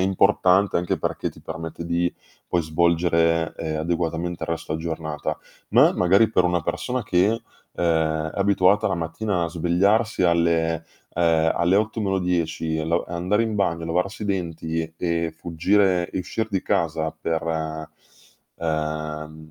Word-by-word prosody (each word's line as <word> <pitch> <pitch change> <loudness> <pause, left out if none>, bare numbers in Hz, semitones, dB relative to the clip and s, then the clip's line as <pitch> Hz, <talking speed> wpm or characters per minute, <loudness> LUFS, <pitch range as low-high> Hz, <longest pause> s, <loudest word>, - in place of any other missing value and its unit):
è - - +2
importante 95 0 +3
anche 85 0 0
perché - - -2
ti - - -16
permette 80 0 -6
di, 85 +1 0 0.4
poi, 85 - +1
svolgere, 85 0 +2
ehm, 80 -1 -3
adeguatamente 85 +1 -2
il - - -3
resto 80 -1 -3
giornata. 80 -2 -4 0.3
Ma - - +6
è - - -3
magari 95 +5 +4
per 90 - +3
una 90 -1 +1
persona 125 - -2
che, 90 -1 +3
uhm, 115 +1 -1 0.9
è - - -8
abituata 100 +1 +3
la - - -1
mattina 85 +3 -2
a - - -2
svegliarsi 90 +6 +1
alle 85 -1 +2 0.3
uhm, 80 -1 +3
alle 85 +3 +3
8 110 +2 0
meno 95 -2 0
10 85 -3 -1
e 80 - -2
lo 85 +1 +1
e - - -9
andare 90 +6 +1
in 110 -1 -2
bagno, 85 -5 0
lavarsi 90 +6 -1
i - - -2
denti 80 -4 -3
e 85 -1 -1
fuggire 90 +2 +1
e - - -3
uscir 110 +4 -3
di 95 -3 -1
casa 80 -1 0
per 80 +1 -1
uhm, 80 -1 -5
85 Hz, 155 wpm, -23 LUFS, 80-95 Hz, 0.9 s, Ma